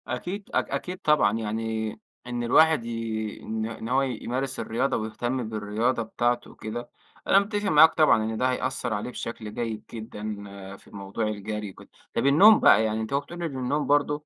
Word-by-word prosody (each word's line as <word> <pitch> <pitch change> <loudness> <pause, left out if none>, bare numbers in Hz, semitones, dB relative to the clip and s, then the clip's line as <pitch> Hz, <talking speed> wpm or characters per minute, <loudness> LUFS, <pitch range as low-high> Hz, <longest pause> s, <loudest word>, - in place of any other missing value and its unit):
أكيد 195 +3 -5
أك - - +1
أكيد 180 +1 -3
طبعًا 150 - +3
يعني 110 0 -2 0.4
إن 120 0 -3
الواحد 155 +1 +4
ي 115 -2 -4
إن 110 0 -3
إن 115 0 -6
هو 130 +2 +3
يمارس 130 0 -3
الرياضة 120 +5 0
ويهتم 115 +2 -3
بالرياضة 110 +3 -1
بتاعته 120 +2 -1
وكده. 115 +2 -7 0.4
أنا 195 - +6
متّفق 205 0 -2
معاك 160 0 +7
طبعًا 155 -8 +4
إن 110 0 -3
ده 130 +2 +2
هيأثّر 125 -2 -2
عليه 105 +4 -3
بشكل 115 -3 -6
جيد 115 -2 -4
جدًا 110 -2 -7 0.5
في - - -22
الموضوع 100 +2 -4
الجري 105 0 -4
وكده. - - -16 0.2
طب - - 0
النوم 195 +11 +7
بقى 110 - +6
يعني 110 0 -1
أنت 110 +4 -5
أهو 140 - +3
بتقول 175 +4 -8
إن 150 -6 -3
النوم 135 +4 -1
برضو، 145 +1 +1
120 Hz, 175 wpm, -26 LUFS, 110-140 Hz, 0.5 s, معاك